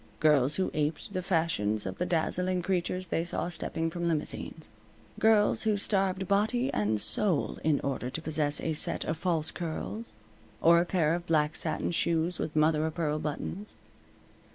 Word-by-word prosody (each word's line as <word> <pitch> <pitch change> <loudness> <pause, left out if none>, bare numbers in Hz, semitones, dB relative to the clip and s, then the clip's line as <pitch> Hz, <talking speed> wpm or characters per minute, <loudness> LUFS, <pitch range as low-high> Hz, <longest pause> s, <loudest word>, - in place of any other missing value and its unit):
Girls 150 -2 +3
who 190 - -1
aped 155 +6 -2
the 185 - -2
fashions 160 - 0
of - - -6
the 180 - -1
dazzling 180 +2 0
creatures 185 -1 -2
they 165 - 0
saw 175 0 -2
stepping 165 -1 -2
from 175 0 -3
limousines. 160 -1 -3 0.5
Girls 220 -2 +3
who 215 -2 +1
starved 190 -2 0
body 220 +6 +1
and 105 +1 0
soul 195 - +2
in 150 -2 +2
order 135 -2 -3
to 145 - -4
possess 155 -2 +3
a 160 - -1
set 150 - +3
of 160 - -1
false 160 -2 -1
curls, 175 - -6 0.4
or 170 +1 +5
a 170 - +1
pair 165 -4 +1
of 175 0 -4
black 155 -1 +1
satin - - -1
shoes 170 +1 0
with 155 - -4
mother 155 0 +3
o' 160 - 0
pearl 155 -2 -2
buttons. 160 +7 -5
165 Hz, 170 wpm, -29 LUFS, 155-185 Hz, 0.5 s, or